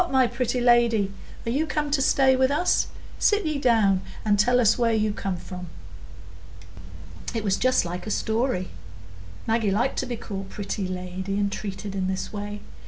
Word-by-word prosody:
my 265 Hz, -1 st, +4 dB
pretty 245 Hz, +1 st, -1 dB
lady, 235 Hz, -5 st, +3 dB, 0.3 s
are 230 Hz, -, -1 dB
you 300 Hz, +6 st, 0 dB
come 300 Hz, -1 st, -1 dB
to 285 Hz, -1 st, +2 dB
stay 265 Hz, 0 st, +4 dB
with 260 Hz, 0 st, +3 dB
us? 300 Hz, +6 st, +2 dB, 0.3 s
Sit 415 Hz, -3 st, +3 dB
ye 305 Hz, -2 st, -1 dB
down 220 Hz, -7 st, +3 dB, 0.2 s
and 205 Hz, -1 st, +3 dB
tell 245 Hz, +4 st, +4 dB
us 225 Hz, -2 st, +5 dB
where 230 Hz, -2 st, +2 dB
you 215 Hz, -1 st, +1 dB
come 195 Hz, -3 st, -3 dB
from." 180 Hz, +1 st, -8 dB, 1.7 s
It 225 Hz, -, -1 dB
was 195 Hz, -2 st, +2 dB
just 255 Hz, -2 st, +2 dB
like 180 Hz, +4 st, -5 dB
a -, -, -2 dB
story; 220 Hz, -3 st, 0 dB, 0.8 s
Maggie 225 Hz, -2 st, +1 dB
liked 235 Hz, +7 st, 0 dB
to 260 Hz, -, -2 dB
be 245 Hz, -, -3 dB
called 195 Hz, -3 st, -6 dB
pretty 200 Hz, -1 st, -4 dB
lady 185 Hz, +2 st, -4 dB
and 200 Hz, -1 st, 0 dB
treated 200 Hz, 0 st, -5 dB
in 190 Hz, -1 st, -1 dB
this 190 Hz, +2 st, -3 dB
way. 205 Hz, 0 st, -5 dB
220 Hz, 175 wpm, -25 LUFS, 195-250 Hz, 1.7 s, us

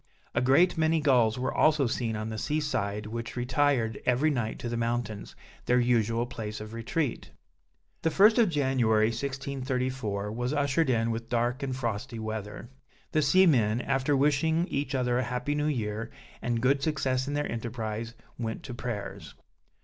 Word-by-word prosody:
A 120 Hz, -, +1 dB
great 160 Hz, +7 st, +4 dB
many 160 Hz, 0 st, +3 dB
gulls 125 Hz, -7 st, +3 dB
were 125 Hz, -, -1 dB
also 155 Hz, -3 st, +3 dB
seen 115 Hz, -1 st, -1 dB
on 110 Hz, +1 st, -3 dB
the 110 Hz, -1 st, -4 dB
sea 150 Hz, +7 st, 0 dB
side 105 Hz, -8 st, -2 dB
which 115 Hz, +2 st, -5 dB
retired 125 Hz, -3 st, +1 dB
every 130 Hz, +5 st, +2 dB
night 120 Hz, -5 st, -2 dB
to -, -, -5 dB
the 120 Hz, -, -2 dB
mountains, 115 Hz, -2 st, -3 dB, 0.3 s
their 125 Hz, 0 st, +4 dB
usual 115 Hz, -1 st, +2 dB
place 110 Hz, -3 st, -6 dB
of 110 Hz, +1 st, -8 dB
retreat. 115 Hz, +4 st, -2 dB, 0.7 s
The 165 Hz, -, +2 dB
first 210 Hz, +8 st, +5 dB
of 225 Hz, -5 st, +5 dB
January 125 Hz, -8 st, +2 dB
1634, 130 Hz, -5 st, -3 dB
was 125 Hz, +4 st, -2 dB
ushered 145 Hz, +1 st, +1 dB
in 115 Hz, -2 st, +2 dB
with 115 Hz, 0 st, -5 dB
dark 120 Hz, +2 st, 0 dB
and 135 Hz, -2 st, -2 dB
frosty 120 Hz, 0 st, -3 dB
weather; 110 Hz, +1 st, -6 dB, 0.4 s
the 155 Hz, -, +2 dB
seamen, 140 Hz, -, +4 dB
after 135 Hz, +2 st, +1 dB
wishing 150 Hz, +4 st, +2 dB
each 140 Hz, 0 st, -2 dB
other 125 Hz, -1 st, +1 dB
a -, -, +1 dB
happy 125 Hz, +4 st, -2 dB
new 150 Hz, 0 st, 0 dB
year, 110 Hz, -5 st, -2 dB, 0.3 s
and 120 Hz, -1 st, -1 dB
good 135 Hz, +2 st, +3 dB
success 135 Hz, -3 st, 0 dB
in 145 Hz, -, -2 dB
their 145 Hz, -, 0 dB
enterprize, 115 Hz, 0 st, -4 dB, 0.2 s
went 110 Hz, -2 st, -4 dB
to 125 Hz, -, -7 dB
prayers. 120 Hz, -4 st, -6 dB
125 Hz, 165 wpm, -28 LUFS, 115-140 Hz, 0.7 s, first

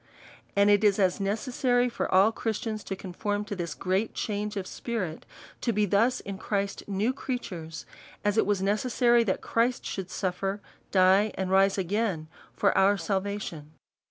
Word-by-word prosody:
And 200 Hz, +1 st, +5 dB
it 205 Hz, +1 st, +4 dB
is 205 Hz, -2 st, +4 dB
as 190 Hz, -2 st, +2 dB
necessary 245 Hz, +4 st, +1 dB
for 240 Hz, -, -3 dB
all 195 Hz, +4 st, +5 dB
Christians 220 Hz, -1 st, -3 dB
to 195 Hz, -, -3 dB
conform 205 Hz, +3 st, -3 dB
to 205 Hz, 0 st, -5 dB
this 170 Hz, -4 st, -4 dB
great 190 Hz, +7 st, -1 dB
change 210 Hz, 0 st, -3 dB
of 190 Hz, -, -3 dB
spirit, 190 Hz, -7 st, -4 dB, 0.3 s
to 235 Hz, -, +1 dB
be 210 Hz, -1 st, +2 dB
thus 225 Hz, +6 st, +2 dB
in 195 Hz, -1 st, -7 dB
Christ 200 Hz, -1 st, -2 dB
new 205 Hz, +5 st, 0 dB
creatures, 185 Hz, -, -5 dB, 0.4 s
as 205 Hz, 0 st, +2 dB
it 220 Hz, -, +3 dB
was 200 Hz, -2 st, +1 dB
necessary 235 Hz, +3 st, +3 dB
that 190 Hz, -, -1 dB
Christ 240 Hz, +2 st, 0 dB
should 190 Hz, -2 st, -4 dB
sutfer, 195 Hz, +2 st, -2 dB, 0.3 s
die, 190 Hz, +3 st, +4 dB
and 190 Hz, -1 st, -2 dB
rise 195 Hz, +1 st, +4 dB
again 190 Hz, -4 st, -1 dB, 0.3 s
for -, -, +2 dB
our 200 Hz, +1 st, +4 dB
salvation. 190 Hz, -4 st, -3 dB
200 Hz, 160 wpm, -28 LUFS, 190-220 Hz, 0.4 s, And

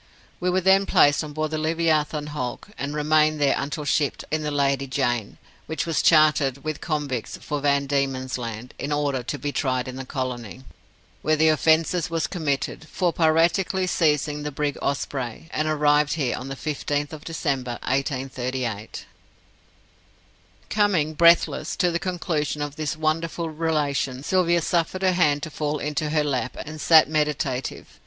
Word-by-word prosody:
We 180 Hz, -, 0 dB
were 185 Hz, +1 st, +2 dB
then 190 Hz, +2 st, +4 dB
placed 145 Hz, +2 st, +4 dB
on 150 Hz, -1 st, -7 dB
board 155 Hz, 0 st, -2 dB
the 155 Hz, -, -1 dB
Leviathan 155 Hz, -2 st, 0 dB
hulk, 125 Hz, +5 st, -4 dB
and 140 Hz, +2 st, -4 dB
remained 155 Hz, 0 st, +3 dB
there 140 Hz, -2 st, +3 dB
until 145 Hz, +2 st, -3 dB
shipped 145 Hz, 0 st, 0 dB
in 155 Hz, 0 st, 0 dB
the 150 Hz, -, -2 dB
Lady 140 Hz, -1 st, +1 dB
Jane, 120 Hz, -5 st, -1 dB, 0.3 s
which 160 Hz, -, -2 dB
was 165 Hz, -2 st, 0 dB
chartered, 150 Hz, -4 st, +4 dB
with 155 Hz, -1 st, -4 dB
convicts, 145 Hz, -7 st, -3 dB
for 150 Hz, -1 st, -4 dB
Van 140 Hz, -1 st, +2 dB
Diemen's 135 Hz, -2 st, -1 dB
Land, 115 Hz, +1 st, -6 dB
in 145 Hz, -, -3 dB
order 145 Hz, -3 st, 0 dB
to 125 Hz, +4 st, -4 dB
be 145 Hz, 0 st, -3 dB
tried 130 Hz, -4 st, -1 dB
in 130 Hz, 0 st, -6 dB
the 130 Hz, -, -5 dB
colony, 130 Hz, -2 st, -5 dB, 0.6 s
where 155 Hz, -, +2 dB
the 160 Hz, +1 st, +4 dB
offence 160 Hz, +2 st, +2 dB
was 165 Hz, -1 st, 0 dB
committed, 155 Hz, -2 st, -2 dB
for 175 Hz, -2 st, 0 dB
piratically 170 Hz, +4 st, +2 dB
seizing 150 Hz, -3 st, +1 dB
the 150 Hz, -, -3 dB
brig 145 Hz, 0 st, -2 dB
Osprey, 135 Hz, 0 st, -3 dB
and 155 Hz, -, -1 dB
arrived 150 Hz, -1 st, +3 dB
here 140 Hz, -6 st, -1 dB
on 130 Hz, -, -7 dB
the 135 Hz, -, -5 dB
15th 145 Hz, +1 st, -3 dB
December, 135 Hz, -6 st, -2 dB
1838." 130 Hz, -4 st, -3 dB, 1.7 s
Coming, 185 Hz, -8 st, +2 dB
breathless, 165 Hz, -1 st, +4 dB
to 180 Hz, -3 st, +2 dB
the 170 Hz, -, -1 dB
conclusion 165 Hz, -5 st, -2 dB
of 145 Hz, -1 st, -5 dB
this 155 Hz, -1 st, -3 dB
wonderful 160 Hz, +1 st, -1 dB
relation, 145 Hz, -4 st, -1 dB
Sylvia 175 Hz, -1 st, +2 dB
suffered 175 Hz, +3 st, 0 dB
her 185 Hz, -, +4 dB
hand 150 Hz, -5 st, +2 dB
to 160 Hz, -, -5 dB
fall 150 Hz, 0 st, -2 dB
into 150 Hz, +1 st, -2 dB
her 150 Hz, 0 st, +2 dB
lap, 130 Hz, -3 st, -2 dB
and 155 Hz, 0 st, -8 dB
sat 160 Hz, -2 st, +7 dB
meditative. 150 Hz, -4 st, -1 dB
150 Hz, 160 wpm, -24 LUFS, 140-160 Hz, 1.7 s, sat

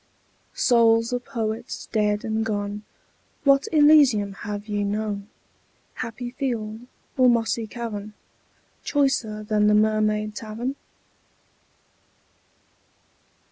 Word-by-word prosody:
Souls 230 Hz, -1 st, +3 dB
of 245 Hz, 0 st, -2 dB
Poets 230 Hz, -1 st, -4 dB
dead 210 Hz, -1 st, 0 dB
and 220 Hz, 0 st, -1 dB
gone, 205 Hz, -1 st, -3 dB, 0.6 s
What 275 Hz, 0 st, +4 dB
Elysium 290 Hz, -10 st, +5 dB
have 205 Hz, +1 st, -6 dB
ye 205 Hz, -1 st, -1 dB
known, 205 Hz, 0 st, -3 dB, 0.7 s
Happy 240 Hz, +2 st, -6 dB
field 235 Hz, -3 st, -4 dB, 0.3 s
or 255 Hz, -1 st, +6 dB
mossy 230 Hz, -1 st, +1 dB
cavern, 215 Hz, -2 st, -6 dB, 0.7 s
Choicer 250 Hz, -7 st, 0 dB
than 210 Hz, -1 st, +2 dB
the 210 Hz, -, +5 dB
Mermaid 215 Hz, 0 st, +1 dB
Tavern? 230 Hz, +3 st, -5 dB
220 Hz, 95 wpm, -24 LUFS, 210-245 Hz, 0.7 s, or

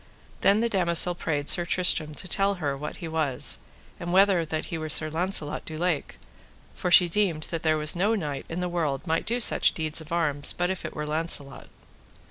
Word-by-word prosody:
Then 205 Hz, +2 st, +3 dB
the 235 Hz, -, +1 dB
damosel 175 Hz, -4 st, +3 dB
prayed 150 Hz, -4 st, -3 dB
Sir 175 Hz, -, +2 dB
Tristram 165 Hz, -3 st, +1 dB
to 185 Hz, -, -9 dB
tell 200 Hz, +3 st, +1 dB
her 145 Hz, -6 st, -3 dB
what 145 Hz, +2 st, -7 dB
he 170 Hz, -, -7 dB
was, 155 Hz, -5 st, 0 dB, 0.4 s
and 175 Hz, -1 st, -5 dB
whether 190 Hz, -2 st, +4 dB
that 155 Hz, -1 st, -4 dB
he 170 Hz, -, -5 dB
were 155 Hz, 0 st, -5 dB
Sir 155 Hz, 0 st, +1 dB
Launcelot 160 Hz, -2 st, 0 dB
du 155 Hz, -, -7 dB
Lake, 175 Hz, -3 st, -2 dB, 0.6 s
for 180 Hz, -, -3 dB
she 175 Hz, 0 st, +6 dB
deemed 170 Hz, -4 st, -1 dB
that 165 Hz, -2 st, -3 dB
there 155 Hz, -1 st, +1 dB
was 155 Hz, +2 st, +2 dB
no 205 Hz, +6 st, +1 dB
knight 145 Hz, -8 st, -5 dB
in 170 Hz, +2 st, -4 dB
the 180 Hz, -, -2 dB
world 160 Hz, -5 st, -2 dB
might 160 Hz, -1 st, -2 dB
do 235 Hz, +2 st, 0 dB
such 235 Hz, -, +4 dB
deeds 155 Hz, 0 st, 0 dB
of 160 Hz, +2 st, -13 dB
arms 150 Hz, -4 st, +1 dB
but 175 Hz, +1 st, -1 dB
if 190 Hz, -, -6 dB
it -, -, -7 dB
were 150 Hz, -, -4 dB
Launcelot. 150 Hz, -3 st, -1 dB
165 Hz, 210 wpm, -25 LUFS, 155-180 Hz, 0.6 s, she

